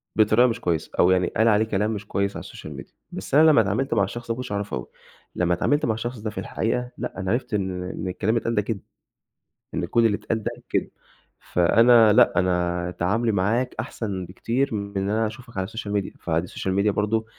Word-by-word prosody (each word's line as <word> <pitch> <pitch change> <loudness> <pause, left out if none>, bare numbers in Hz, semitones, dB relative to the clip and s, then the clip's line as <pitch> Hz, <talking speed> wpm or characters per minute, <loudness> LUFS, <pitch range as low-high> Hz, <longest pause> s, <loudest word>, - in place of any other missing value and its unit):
بطريقة 110 +3 +5
مش 115 -1 -3
كويسة، 85 -3 -1
أو 90 - +6
يعني 90 -1 +3
قال 110 +1 +1
عليه 110 0 +4
كلام 105 0 0
مش 105 0 -6
كويس 100 0 -1
على - - -7
الSocial - - -9
Media - - -29 0.2
بس 95 +8 -4
أنا 160 +1 +7
لمّا 140 - +6
اتعاملت 110 +7 -1
مع 100 -3 +3
الشخص، 115 +4 -5
ما 115 - 0
كنتش 125 -2 -6
أعرفه 100 -8 -2
أوي، 60 - -7 0.5
لمّا 90 0 +1
اتعاملت 145 - +1
مع 110 - +1
الشخص 120 +2 -5
ده 110 0 -3
في - - -12
الحقيقة، 125 +2 -2
لأ، - - -5
أنا 95 +1 -1
عرفت 120 -1 -2
إن 95 -3 -1
إن 90 +1 -5
الكلام 95 +4 -1
اللي - - 0
اتقال 115 - -1
ده 105 - +3
كدب، 105 0 -3 0.9
إن - - -1
كل 115 -1 +2
اللي 105 -2 +2
اتقال 110 -1 -3
ده - - -2 0.2
كدب، - - 0 0.6
فأنا 115 +5 +6
لأ، - - +5
أنا 90 -1 0
تعامُلي 110 +6 +1
معاك 110 +6 0
أحسن 100 -5 -4
بكتير 115 +8 -2
من 100 -1 -4
إن 95 +1 -1
أنا 110 +1 +1
أشوفك 120 0 -10
على 95 0 -1
الSocial - - -14 0.2
Media 100 -2 -1
فدي 85 +1 -1
الSocial 95 - -4
Media - - +4
برضه 105 +2 0
105 Hz, 220 wpm, -24 LUFS, 95-115 Hz, 0.9 s, أنا